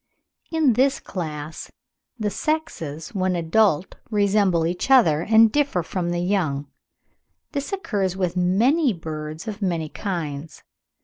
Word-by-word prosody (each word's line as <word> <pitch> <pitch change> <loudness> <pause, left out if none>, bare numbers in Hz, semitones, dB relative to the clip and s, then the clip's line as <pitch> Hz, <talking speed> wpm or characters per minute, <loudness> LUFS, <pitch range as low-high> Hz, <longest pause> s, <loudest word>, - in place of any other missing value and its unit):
In 315 -6 +3
this 265 +4 +2
class 155 -4 -6 0.5
the 210 -3 -1
sexes 170 - -3
when 185 -2 0
adult 175 +1 +2
resemble 200 -5 +2
each 175 +8 -2
other, 195 - +5
and 220 +3 +5
differ 280 - +1
from 175 +1 -3
the 175 0 -1
young. 175 -7 0 0.9
This 285 +5 -3
occurs 200 - -1
with 180 -2 -1
many 230 - +3
birds 155 +1 -6
of 215 -1 -5
many 170 -5 -1
kinds. 160 -6 -5
185 Hz, 125 wpm, -23 LUFS, 165-220 Hz, 0.9 s, other